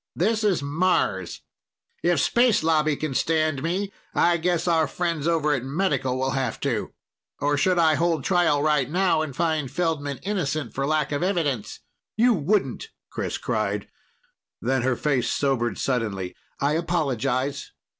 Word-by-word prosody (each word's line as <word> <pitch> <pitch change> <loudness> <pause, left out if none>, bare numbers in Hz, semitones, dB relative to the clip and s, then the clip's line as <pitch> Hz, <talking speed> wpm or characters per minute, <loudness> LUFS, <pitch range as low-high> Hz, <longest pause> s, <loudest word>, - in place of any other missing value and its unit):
This 215 +5 +1
is 195 -8 +2
Mars. 140 - 0 0.6
If 175 -3 +2
Space 235 - +3
Lobby 155 -2 +2
can 155 -1 -3
stand 155 -1 +1
me, 190 +5 -2 0.2
I 170 0 +4
guess 175 +1 0
our 165 -2 +3
friends 170 -4 -2
over 155 -3 +2
at 130 -4 -1
Medical 135 -3 0
will 130 +1 0
have 130 -4 -2
to. - - -1 0.5
Or 145 +1 +1
should 175 +6 +2
I 160 -2 +5
hold 165 -2 +1
trial 175 -6 +2
right 150 -4 +2
now 175 -1 +2
and 150 -4 -4
find 155 -4 0
Feldman 150 -5 -1
innocent 155 - -2
for 135 +1 -1
lack 155 0 0
of 145 - -1
evidence?" 150 - -1 0.4
"You 240 +2 +5
wouldn't!" 205 - 0 0.2
Chris - - -3
cried. - - -2 0.7
Then 130 0 0
her 130 0 +1
face 135 -3 0
sobered 125 -5 0
suddenly. 105 -8 -2 0.2
"I 140 +2 +1
apologize. 140 -5 -1
155 Hz, 150 wpm, -24 LUFS, 135-175 Hz, 0.7 s, I